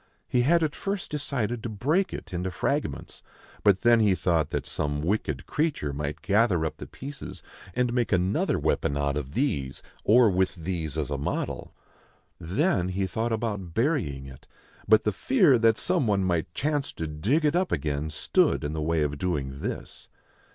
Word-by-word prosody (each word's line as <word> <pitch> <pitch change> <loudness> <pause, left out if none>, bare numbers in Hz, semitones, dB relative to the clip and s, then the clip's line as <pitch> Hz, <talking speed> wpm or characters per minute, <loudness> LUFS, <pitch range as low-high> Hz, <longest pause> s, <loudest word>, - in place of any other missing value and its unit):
He 125 - +2
had 165 +6 +4
at 155 -2 0
first 200 -1 -4
decided 125 -6 -2
to 115 - -4
break 150 - +1
it - - -8
into 90 +1 -2
fragments; 90 - -2 0.4
but 100 -2 +4
then 120 -1 +5
he 105 -4 +4
thought 85 -5 +1
that - - -2
some 75 0 -2
wicked 80 -7 -1
creature 150 - -1
might 75 +2 -4
gather 100 -5 +3
up 80 - -4
the - - -8
pieces, 140 +1 -8 0.3
and 125 -1 +1
make 120 -2 0
another 90 +1 +2
weapon 70 - 0
out 70 0 0
of 70 -2 -4
these 70 - -1 0.2
or 115 +2 +6
with 95 +1 +1
these 80 -3 -3
as 75 -2 -2
a 70 - -2
model. 70 - -3 0.6
Then 95 - +1
he 95 +1 -1
thought 110 +5 -2
about 105 -6 -3
burying 115 - 0
it, 65 -1 -13 0.4
but 110 0 +6
the 105 - 0
fear 175 - +4
that 115 -1 +4
some 180 -9 +1
one 100 -2 +2
might 85 -3 0
chance 145 0 -1
to 80 - -4
dig 100 - 0
it 150 +2 +2
up 185 +1 +1
again 75 0 -1
stood 75 - +1
in 75 +1 -2
the 80 - -3
way 80 0 +1
of 75 -1 -2
doing 70 -7 -2
this. - - -6
95 Hz, 180 wpm, -27 LUFS, 75-125 Hz, 0.6 s, or